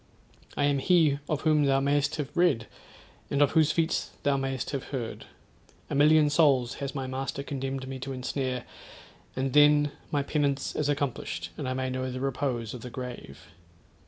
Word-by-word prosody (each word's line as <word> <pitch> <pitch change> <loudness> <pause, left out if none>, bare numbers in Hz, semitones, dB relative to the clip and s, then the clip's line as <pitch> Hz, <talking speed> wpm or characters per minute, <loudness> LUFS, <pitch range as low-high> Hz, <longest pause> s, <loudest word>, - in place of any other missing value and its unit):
I - - +1
am 145 -1 +2
he 155 -3 +3
of 150 -2 0
whom 155 -2 +3
thou 135 -1 +3
may'st 140 +1 +1
have 150 -1 -5
read, 170 -11 +3 0.6
and 140 - 0
of 145 -2 +4
whose 155 -2 +4
feats 165 0 0
thou 140 -1 +3
may'st 135 -2 -2
have 140 -3 -3
heard. 120 -5 -5 0.7
A - - -1
million 150 +2 +5
souls 140 -5 +3
has 140 -1 -4
my 135 -2 -2
master 135 +1 -4
condemned 135 -1 -4
me 130 0 -6
to 135 +2 -5
ensnare, 130 -1 -3 0.7
and 130 0 -1
then 145 0 +5 0.2
my 145 -2 0
penance 140 -2 -1
is 150 -1 0
accomplished, 115 - -2
and 130 - -4
I 130 - -2
may 130 0 -2
know 130 0 -2
the 130 0 -5
repose 130 -4 -2
of 125 - -7
the 125 - -7
grave. 125 - -8
135 Hz, 180 wpm, -28 LUFS, 130-145 Hz, 0.7 s, million